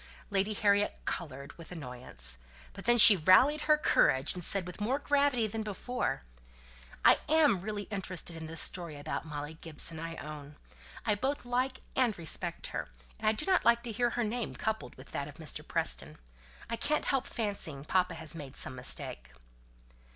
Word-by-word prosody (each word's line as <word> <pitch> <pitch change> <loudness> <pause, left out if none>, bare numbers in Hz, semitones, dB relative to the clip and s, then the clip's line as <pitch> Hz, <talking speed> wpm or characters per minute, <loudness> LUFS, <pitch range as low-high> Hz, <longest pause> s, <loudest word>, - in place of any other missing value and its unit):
Lady 200 +2 +1
Harriet 205 0 +2
coloured 140 -4 -5
with 165 - -11
annoyance. 125 - -4 0.3
But - - -10
then 240 0 +4
she 215 -2 +12
rallied 195 - +5
her 305 - +6
courage, 135 - +3
and 180 - -5
said 195 +1 +3
with 180 +3 -9
more 245 +6 0
gravity 285 -5 +1
than 220 +1 -4
before, 215 - -3 0.8
"I - - +7
am 305 - +4
really 205 +2 -4
interested 185 -4 -4
in 160 -1 -7
this 165 0 0
story 170 -5 -1
about 145 - -5
Molly 150 0 -6
Gibson, 160 0 +1
I 165 0 -6
own. 150 -1 -9 0.5
I 215 - +2
both 265 +6 -2
like 255 +2 -1
and 245 -5 +2
respect 165 -3 -2
her; - - -4 0.3
and - - -3
I - - +6
do 215 - -3
not 380 -1 +2
like 235 0 +3
to 240 - -5
hear 240 +2 +1
her 240 +1 -2
name 230 +2 -3
coupled 220 0 -3
with 130 - -14
that 140 - -4
of 145 - -11
Mr. 160 0 -3
Preston. - - -1 0.5
I 230 - -3
can't 300 +6 0
help 270 -2 0
fancying 200 -10 -1
papa 180 0 +1
has 160 -1 -7
made 145 -5 -9
some - - 0
mistake." 65 - -5
195 Hz, 180 wpm, -31 LUFS, 155-235 Hz, 0.8 s, she